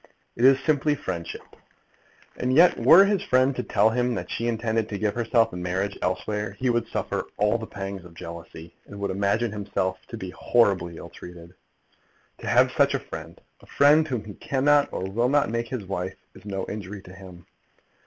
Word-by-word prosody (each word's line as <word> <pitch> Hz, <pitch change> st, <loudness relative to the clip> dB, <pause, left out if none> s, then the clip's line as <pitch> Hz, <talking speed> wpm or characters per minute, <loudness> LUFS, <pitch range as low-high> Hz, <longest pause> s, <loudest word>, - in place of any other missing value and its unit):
It 120 Hz, -, +2 dB
is 135 Hz, 0 st, +7 dB
simply 150 Hz, 0 st, +1 dB
friendship. 85 Hz, -9 st, -5 dB, 0.9 s
And 130 Hz, +1 st, -1 dB
yet 175 Hz, +4 st, +6 dB
were 195 Hz, +4 st, +8 dB
his 200 Hz, -1 st, +1 dB
friend 130 Hz, +1 st, +2 dB
to -, -, -2 dB
tell 110 Hz, +2 st, +2 dB
him 125 Hz, +1 st, 0 dB
that -, -, -5 dB
she 115 Hz, -, -2 dB
intended 115 Hz, -1 st, -1 dB
to 100 Hz, -, -3 dB
give 105 Hz, 0 st, 0 dB
herself 115 Hz, -1 st, +1 dB
in 90 Hz, -, -5 dB
marriage 95 Hz, +3 st, -2 dB
elsewhere, 105 Hz, +3 st, -2 dB
he 125 Hz, +4 st, 0 dB
would 120 Hz, -1 st, 0 dB
suffer -, -, -3 dB
all 105 Hz, +3 st, +2 dB
the 110 Hz, -, -7 dB
pangs 95 Hz, -2 st, -6 dB
of 85 Hz, -1 st, -14 dB
jealousy, 85 Hz, 0 st, -10 dB
and 100 Hz, -, -10 dB
would 100 Hz, -1 st, -2 dB
imagine 100 Hz, +4 st, 0 dB
himself 100 Hz, -2 st, -2 dB
to -, -, -7 dB
be 95 Hz, -1 st, -6 dB
horribly 95 Hz, -5 st, +1 dB
ill -, -, -9 dB
treated! 85 Hz, 0 st, -12 dB, 0.9 s
To -, -, -8 dB
have -, -, +4 dB
such -, -, +2 dB
a -, -, 0 dB
friend, -, -, -9 dB, 0.2 s
a -, -, -19 dB
friend 150 Hz, +2 st, +4 dB
whom 125 Hz, -7 st, -3 dB
he 105 Hz, -, -9 dB
cannot 140 Hz, +4 st, +2 dB
or -, -, -4 dB
will 115 Hz, +6 st, 0 dB
not 145 Hz, -4 st, +2 dB
make 115 Hz, 0 st, -2 dB
his 115 Hz, -5 st, -5 dB
wife, 95 Hz, -1 st, -4 dB, 0.2 s
is -, -, -16 dB
no 95 Hz, -2 st, -3 dB
injury 100 Hz, -1 st, -7 dB
to 90 Hz, -, -13 dB
him. 95 Hz, -2 st, -13 dB
105 Hz, 195 wpm, -25 LUFS, 95-125 Hz, 0.9 s, were